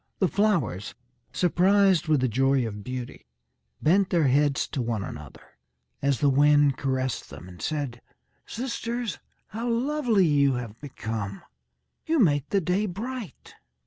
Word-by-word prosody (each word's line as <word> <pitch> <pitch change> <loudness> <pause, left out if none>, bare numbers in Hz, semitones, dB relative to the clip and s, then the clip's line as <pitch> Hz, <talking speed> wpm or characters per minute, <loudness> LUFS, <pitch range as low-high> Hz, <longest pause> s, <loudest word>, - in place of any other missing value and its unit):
The 190 - +2
flowers, 170 - 0 0.4
surprised 185 0 +3
with 155 -4 +3
the 130 - +2
joy 135 +2 +2
of 105 -2 -6
beauty, 125 - -7 0.6
bent 190 +4 +3
their 165 -6 +3
heads 145 +1 +2
to 135 - -2
one 115 -4 -2
another, 75 -5 -9 0.6
as 140 -4 +1
the 145 - +4
wind 145 0 +4
caressed 130 -5 -2
them, 70 +6 -11
and 90 -1 -12
said: 140 -6 -3 0.5
"Sisters, 235 -2 -4 0.3
how 230 +3 -4
lovely 240 -4 +2
you 140 -3 +3
have 115 -3 -7
become. 110 -8 -5 0.6
You 325 +1 +2
make 150 - +2
the 200 - +2
day 185 +5 0
bright." 220 - -7
145 Hz, 140 wpm, -26 LUFS, 125-200 Hz, 0.6 s, the